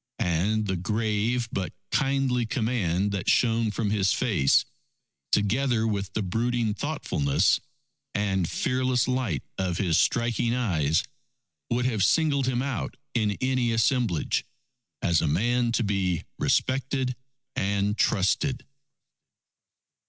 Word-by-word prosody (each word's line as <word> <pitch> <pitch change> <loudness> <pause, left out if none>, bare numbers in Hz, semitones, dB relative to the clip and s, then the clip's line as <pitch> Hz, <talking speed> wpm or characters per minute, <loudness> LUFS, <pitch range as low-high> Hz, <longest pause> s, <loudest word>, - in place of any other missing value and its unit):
And 105 +3 0
the 95 -2 -1
grave 110 +5 0
but 95 -2 -3 0.2
kindly 135 -4 +1
command 105 -6 0
that 100 -3 -2
shone 115 -2 +3
from 105 0 -2
his 100 -3 +2
face, 70 -4 +3 0.7
together 115 +3 +2
with 100 -3 -2
the 110 - -1
brooding 115 +3 0
thoughtfulness 100 - +1 0.6
and 95 -4 0
fearless 130 -1 0
light 125 - -1 0.2
of 90 -3 -1
his 85 -4 +2
striking 120 0 +1
eyes, 80 - +1 0.7
would 120 +1 0
have 110 -6 +1
singled 140 +3 +2
him 125 -1 0
out 135 -4 -3 0.2
in 110 -3 +1
any 130 -2 +1
assemblage, 115 - +1 0.6
as 85 -2 +3
a - - 0
man 120 +10 +1
to 120 - +1
be 95 -4 0 0.2
respected 130 -1 0 0.4
and 100 +1 0
trusted. 120 +6 +1
110 Hz, 115 wpm, -26 LUFS, 95-125 Hz, 0.7 s, shone